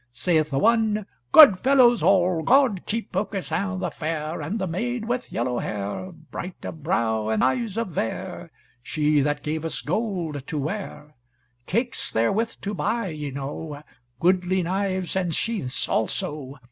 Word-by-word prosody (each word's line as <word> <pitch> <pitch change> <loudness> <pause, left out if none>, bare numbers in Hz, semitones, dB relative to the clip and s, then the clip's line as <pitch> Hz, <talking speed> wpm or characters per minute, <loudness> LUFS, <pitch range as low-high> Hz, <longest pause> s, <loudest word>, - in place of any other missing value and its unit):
Saith 155 +4 +1
the 135 - -1
one, 215 +2 +2 0.3
"Good 265 -13 +9
fellows 255 -2 +5
all, 180 -3 +3
God 245 - +3
keep 225 -3 -3
Aucassin 190 -1 -2
the - - -2
fair, 155 0 -3
And 165 +9 -3
the 190 - -1
maid 220 +7 -2
with 245 +2 -3
yellow 120 +1 -1
hair, 105 - -4
Bright 170 +2 -8
of 160 - -7
brow 110 -8 0
and 110 -1 +1
eyes 195 - 0
of 230 -3 -1
vair. 115 -9 -4 0.3
She 150 +3 +1
that 145 +1 0
gave 155 +1 -2
us 165 - -2
gold 170 - -2
to 155 - -3
ware. 150 -1 -5 0.5
Cakes 235 +5 -1
therewith 210 - +1
to 205 - -3
buy 230 +1 -1
ye 150 -2 -5
know, 145 +2 -6 0.4
Goodly 185 +2 +2
knives 190 0 -1
and 180 -4 0
sheaths 200 - -1
also. 135 +5 -2
175 Hz, 150 wpm, -24 LUFS, 150-210 Hz, 0.5 s, Good